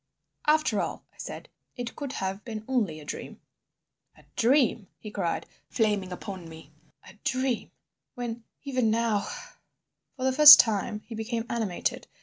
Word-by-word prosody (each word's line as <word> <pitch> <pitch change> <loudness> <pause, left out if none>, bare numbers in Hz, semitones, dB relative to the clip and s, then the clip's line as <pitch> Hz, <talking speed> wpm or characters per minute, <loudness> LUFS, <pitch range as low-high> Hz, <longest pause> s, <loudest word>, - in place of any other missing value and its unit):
"After 305 -8 +3
all," - - -5
I - - -30
said, - - -7 0.3
"it 245 -2 -6
could 280 -3 -5
have 195 +2 -4
been 220 -2 -7
only 215 -12 0
a 150 - -12
dream." - - -7 0.8
"A - - -19
dream!" 245 -4 +2
he 215 - -9
cried, 185 -5 -2 0.2
flaming 205 -4 0
upon 180 -2 -7
me, 160 -2 -13 0.4
"a 190 - -13
dream—when, 245 -2 -4 0.2
even 255 -5 0
now—" 220 -2 +1 0.9
For 255 - -5
the 260 - +3
first 295 +1 +12
time 210 -1 +1
he 235 - -9
became 225 +1 -3
animated. 220 -7 -2
225 Hz, 140 wpm, -27 LUFS, 200-255 Hz, 0.9 s, first